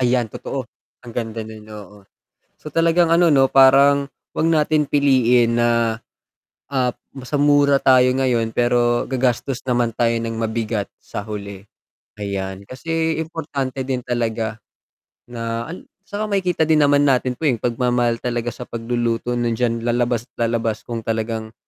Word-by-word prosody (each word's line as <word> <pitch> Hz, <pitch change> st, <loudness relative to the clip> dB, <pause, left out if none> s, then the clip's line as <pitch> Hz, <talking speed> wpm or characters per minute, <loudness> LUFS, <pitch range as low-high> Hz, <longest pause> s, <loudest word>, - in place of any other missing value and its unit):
Ayan 120 Hz, -2 st, +1 dB
totoo, 135 Hz, -2 st, -5 dB, 0.4 s
ang 120 Hz, -, -9 dB
ganda 115 Hz, -1 st, -4 dB
nun, 110 Hz, 0 st, -11 dB
oo. 105 Hz, -1 st, -11 dB, 0.6 s
So, 150 Hz, -, -7 dB
talagang 165 Hz, +2 st, +3 dB
ano, 170 Hz, 0 st, +4 dB
'no, 135 Hz, -1 st, +4 dB
parang 140 Hz, +1 st, +6 dB, 0.3 s
'wag 160 Hz, -, +1 dB
natin 155 Hz, -1 st, +2 dB
piliin 125 Hz, -4 st, +3 dB
na, 120 Hz, 0 st, +3 dB, 1.0 s
ah, 125 Hz, -2 st, +1 dB, 0.3 s
sa 145 Hz, -, -2 dB
mura 145 Hz, -1 st, +4 dB
tayo 130 Hz, -1 st, +6 dB
ngayon 120 Hz, -4 st, 0 dB
pero 120 Hz, 0 st, +2 dB
gagastos 130 Hz, 0 st, 0 dB
naman 120 Hz, -1 st, +1 dB
tayo 115 Hz, +1 st, +1 dB
ng 115 Hz, 0 st, -3 dB
mabigat 110 Hz, -2 st, -2 dB
sa 100 Hz, -, -7 dB
huli, 100 Hz, -2 st, -7 dB, 0.5 s
ayan. 95 Hz, -1 st, -4 dB
Kasi 160 Hz, +6 st, -2 dB
importante 140 Hz, -5 st, -4 dB
din 130 Hz, -2 st, -1 dB
talaga 115 Hz, -2 st, -2 dB, 0.7 s
na 115 Hz, -1 st, -4 dB
al 180 Hz, -, -10 dB, 0.2 s
'saka 205 Hz, +2 st, -4 dB
makikita 185 Hz, -5 st, 0 dB
din 155 Hz, -1 st, +4 dB
naman 145 Hz, 0 st, +4 dB
natin 130 Hz, -1 st, +1 dB
po, 160 Hz, -, 0 dB
eh, 130 Hz, -, +3 dB
yung 110 Hz, -, -15 dB
pagmamahal 120 Hz, -1 st, +1 dB
talaga 120 Hz, -1 st, -2 dB
sa 125 Hz, -, -9 dB
pagluluto 115 Hz, 0 st, -2 dB
nandiyan 115 Hz, 0 st, -1 dB
lalabas 120 Hz, 0 st, 0 dB
at -, -, -67 dB
lalabas 115 Hz, -1 st, -2 dB
kung 115 Hz, -1 st, -5 dB
talagang 110 Hz, 0 st, -3 dB
120 Hz, 145 wpm, -20 LUFS, 115-140 Hz, 1.0 s, parang